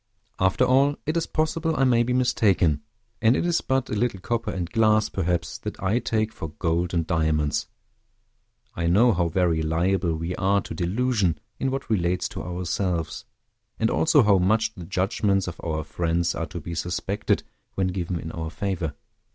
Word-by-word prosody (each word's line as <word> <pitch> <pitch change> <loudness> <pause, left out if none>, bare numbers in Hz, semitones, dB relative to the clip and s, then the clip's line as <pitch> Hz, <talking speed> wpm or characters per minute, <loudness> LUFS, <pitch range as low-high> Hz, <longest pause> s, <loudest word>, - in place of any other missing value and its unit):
After 95 +7 +3
all, 135 +3 +4
it 155 +2 -1
is 165 - 0
possible 160 +1 0
I 135 - +2
may 120 -3 +4
be 120 +1 0
mistaken; 100 - +2 0.4
and 115 +2 +5
it - - 0
is 175 -1 +1
but 130 0 0
a - - 0
little 105 -2 0
copper 115 +5 -2
and 90 -3 -3
glass, 110 +1 +3
perhaps, 85 -3 -2
that - - -6
I 100 +6 +1
take 110 -2 -1
for 80 - -6
gold 85 +3 -1
and 85 -1 +1
diamonds. 80 -3 0 1.1
I 85 0 -2
know 110 +8 +5
how 85 -2 +1
very 85 -1 +1
liable 85 +2 +1
we 85 +3 -3
are 100 +2 +2
to - - -7
delusion 95 -2 0 0.2
in 135 - 0
what 135 +1 -3
relates 90 -4 0
to - - -6
ourselves, 90 -1 -2 0.5
and 110 - +1
also 150 -4 +4
how 100 -3 +4
much 110 +4 +2
the 90 -6 -9
judgments 95 +1 0
of 90 - -7
our 80 -2 -2
friends 85 +2 0
are 80 - -3
to 85 - -6
be 85 +2 -7
suspected 90 +4 -1 0.3
when 95 -1 +1
given 90 -2 -3
in 80 - -6
our 80 -1 -4
favor. 90 -5 -3
95 Hz, 180 wpm, -25 LUFS, 85-115 Hz, 1.1 s, and